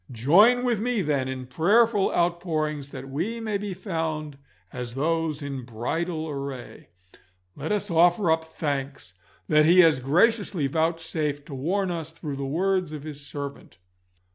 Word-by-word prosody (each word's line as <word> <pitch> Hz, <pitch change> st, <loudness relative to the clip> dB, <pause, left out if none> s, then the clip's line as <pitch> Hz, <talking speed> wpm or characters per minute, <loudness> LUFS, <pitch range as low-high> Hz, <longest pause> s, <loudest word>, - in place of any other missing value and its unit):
Join 200 Hz, -, +5 dB
with 240 Hz, -4 st, +1 dB
me, 230 Hz, -2 st, 0 dB
then, 140 Hz, -4 st, 0 dB
in 130 Hz, -1 st, -5 dB
prayerful 205 Hz, -, +3 dB
outpourings 155 Hz, -4 st, -1 dB
that 135 Hz, -1 st, -8 dB
we 175 Hz, +13 st, -3 dB
may 215 Hz, -3 st, -2 dB
be 200 Hz, -2 st, -4 dB
found 160 Hz, -6 st, -4 dB, 0.3 s
as 125 Hz, -1 st, -6 dB
those 160 Hz, +1 st, -1 dB
in 135 Hz, -2 st, -5 dB
bridal 155 Hz, +8 st, -3 dB
array. 140 Hz, -4 st, -7 dB, 0.7 s
Let -, -, -4 dB
us 205 Hz, -2 st, -1 dB
offer 175 Hz, +2 st, +4 dB
up 160 Hz, 0 st, +1 dB
thanks 140 Hz, -, -4 dB, 0.3 s
that 150 Hz, 0 st, +5 dB
He 175 Hz, +3 st, +7 dB
has 160 Hz, -6 st, +5 dB
graciously 180 Hz, -, +2 dB
vouchsafed 160 Hz, -1 st, -1 dB
to 150 Hz, -, -9 dB
warn 180 Hz, +8 st, -1 dB
us 165 Hz, -2 st, -5 dB
through 150 Hz, -4 st, -6 dB
the 140 Hz, -, -3 dB
words 185 Hz, +3 st, 0 dB
of 150 Hz, -2 st, -6 dB
His 150 Hz, -2 st, -7 dB
servant. 140 Hz, -4 st, -7 dB
160 Hz, 150 wpm, -25 LUFS, 140-180 Hz, 0.7 s, He